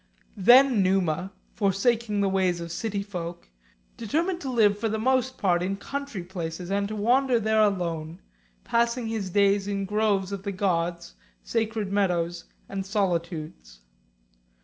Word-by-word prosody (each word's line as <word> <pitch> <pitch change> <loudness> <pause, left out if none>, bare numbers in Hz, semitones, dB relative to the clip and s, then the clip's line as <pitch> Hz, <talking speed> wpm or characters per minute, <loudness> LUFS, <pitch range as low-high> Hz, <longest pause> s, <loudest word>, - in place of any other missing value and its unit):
IV. 190 - -8
Then 250 -2 +7
Numa, 185 -1 +1 0.2
forsaking 210 +1 +1
the 200 - +2
ways 190 -2 +1
of 170 0 -6
city 205 +1 -3
folk, 175 -4 -7 0.5
determined 335 - -1
to 270 - -4
live 210 -4 +3
for 225 +1 -1
the 220 - -1
most 260 +2 +1
part 175 -3 +2
in 195 +2 -2
country 280 -5 -5
places, 175 0 -6
and 200 0 0
to 215 - -5
wander 245 +4 +2
there 220 0 +2
alone, 170 -5 -1 0.4
passing 235 +1 +1
his 220 -4 -3
days 200 +1 +2
in 200 -1 -2
groves 205 -2 0
of 200 -1 -4
the 200 0 -4
gods, 175 -3 -1 0.3
sacred 220 -3 -2
meadows, 175 -4 0 0.2
and 195 -1 -4
solitudes. 170 - -3
200 Hz, 150 wpm, -26 LUFS, 180-220 Hz, 0.5 s, Then